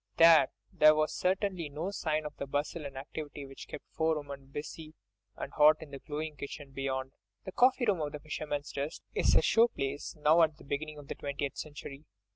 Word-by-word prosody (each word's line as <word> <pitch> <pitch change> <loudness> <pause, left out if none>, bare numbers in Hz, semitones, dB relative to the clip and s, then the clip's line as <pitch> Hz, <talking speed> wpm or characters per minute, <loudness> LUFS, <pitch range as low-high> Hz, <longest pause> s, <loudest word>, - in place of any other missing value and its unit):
There, 165 -5 +8 0.3
there 155 0 +7
was 155 0 +1
certainly 185 -3 0
no 160 +7 -3
sign 155 -5 -1
of 150 - -6
that 140 - -4
bustle 145 +2 -2
and 135 -1 -10
activity 145 +1 -6
which 135 0 -10
kept - - -8
four 160 -1 +1
women 140 -2 -8
busy 155 +3 -7 0.4
and - - -6
hot 150 +1 +7
in 155 -2 -10
the 140 - -7
glowing 155 +1 -5
kitchen 140 0 -7
beyond. 135 -1 -3 0.3
The 190 - -5
coffee 255 +3 +4
room 195 -7 +2
of 150 -1 -2
"The 150 - -6
Fisherman's 150 -1 -4
Rest" 140 +2 -4
is - - +3
a - - +5
show 230 +1 +5
place 140 - -4
now 155 +2 +5
at 155 -2 +3
the - - -15
beginning 150 +2 -4
of 145 -1 -11
the - - -3
twentieth 140 0 -4
century. 145 -1 -8
150 Hz, 205 wpm, -31 LUFS, 140-160 Hz, 0.4 s, There